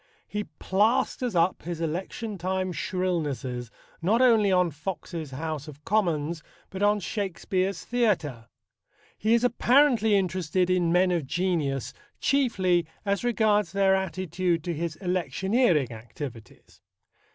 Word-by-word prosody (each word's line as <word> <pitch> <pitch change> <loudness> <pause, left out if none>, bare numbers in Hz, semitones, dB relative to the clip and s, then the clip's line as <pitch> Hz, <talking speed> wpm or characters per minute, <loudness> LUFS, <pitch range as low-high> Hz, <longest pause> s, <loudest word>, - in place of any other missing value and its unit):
He 210 0 -3
plasters 220 - 0
up 170 +2 +2
his 170 -1 -5
election 185 +6 -4
time 185 +1 -1
shrillnesses 150 -10 -2 0.3
not 205 +8 +2
only 225 -6 +5
on 180 -2 +3
Fox's 160 0 -5
House 155 +2 -5
of 150 0 -12
Commons 170 -6 0 0.3
but 190 - -6
on 205 +1 +3
Shakespeare's 190 -1 -2
Theatre. 175 - 0 0.7
He 220 +3 +2
is 235 - +1
apparently 245 -2 +4
interested 185 -1 +1
in 175 -2 +2
men 180 +1 +4
of 165 -6 -1
genius 155 -7 -1 0.3
chiefly 190 - +2 0.2
as 200 +1 0
regards 215 -6 +2
their 195 -1 +4
attitude 185 -2 -1
to 175 -1 -2
his 165 0 -3
electioneering 180 - +1
activities. 115 +1 -10
185 Hz, 120 wpm, -27 LUFS, 160-205 Hz, 0.7 s, only